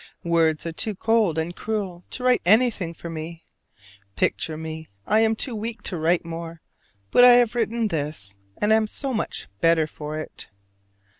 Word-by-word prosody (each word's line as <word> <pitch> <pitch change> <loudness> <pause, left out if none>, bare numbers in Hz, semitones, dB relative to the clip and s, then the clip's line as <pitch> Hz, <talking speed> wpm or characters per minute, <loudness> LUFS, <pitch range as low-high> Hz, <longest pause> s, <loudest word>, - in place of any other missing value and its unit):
Words 165 -2 +2
are 165 - -2
too 210 +6 -2
cold 220 -5 +2
and 165 +2 -2
cruel 200 -5 -4
to 250 - -5
write 250 -1 +3
anything 210 -3 +3
for 170 0 -9
me. 165 0 -7 0.7
Picture 155 -1 0
me: 160 0 -7 0.2
I 215 +2 +3
am 225 0 +3
too 250 +3 0
weak 220 0 -5
to 185 - -3
write 165 +2 +1
more, 165 0 -7 0.5
but 245 - +6
I 250 0 +10
have 240 -2 +4
written 230 -1 0
this, 145 - -3 0.2
and 210 +1 +2
am 220 0 +3
so 270 +4 -4
much 220 - -3
better 165 -1 +4
for 150 0 -7
it. 155 - -7
175 Hz, 170 wpm, -24 LUFS, 160-220 Hz, 0.7 s, I